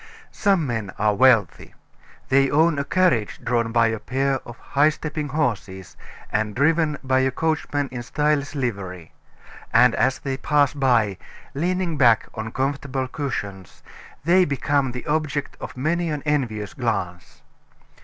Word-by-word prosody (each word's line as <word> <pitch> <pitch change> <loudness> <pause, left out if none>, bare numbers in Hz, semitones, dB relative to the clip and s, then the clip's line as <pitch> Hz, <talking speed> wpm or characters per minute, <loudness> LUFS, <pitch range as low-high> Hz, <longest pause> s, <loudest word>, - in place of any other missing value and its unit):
IX - - -25
Some 195 -6 +3
men 110 -6 -3
are 105 0 +2
wealthy. 115 - +2 0.5
They 135 0 +4
own 155 0 +3
a - - 0
carriage 160 - +1
drawn 115 -1 0
by 115 0 +3
a 110 -1 -3
pair 135 +2 -1
of 120 0 -10
high 145 +2 +2
stepping 150 -1 -4
horses, 105 - -3 0.4
and 110 -1 -1
driven 155 +2 +2
by 130 0 +2
a 130 0 +2
coachman 145 0 -1
in 125 -1 -5
stylish 150 +3 -1
livery; 100 - -4 0.6
and 125 +1 +5
as 130 - +1
they 135 -1 -4
pass 145 0 +2
by, 120 -8 +1 0.3
leaning 175 +2 -1
back 120 -5 +4
on 110 0 -5
comfortable 135 0 -2
cushions, 100 - -6 0.4
they 180 +4 +5
become 140 -3 0
the 125 0 -7
object 150 -2 -2
of - - -8
many 170 +5 0
an 150 -2 -3
envious 120 -9 -1
glance. 105 -9 -4
135 Hz, 145 wpm, -23 LUFS, 115-150 Hz, 0.6 s, and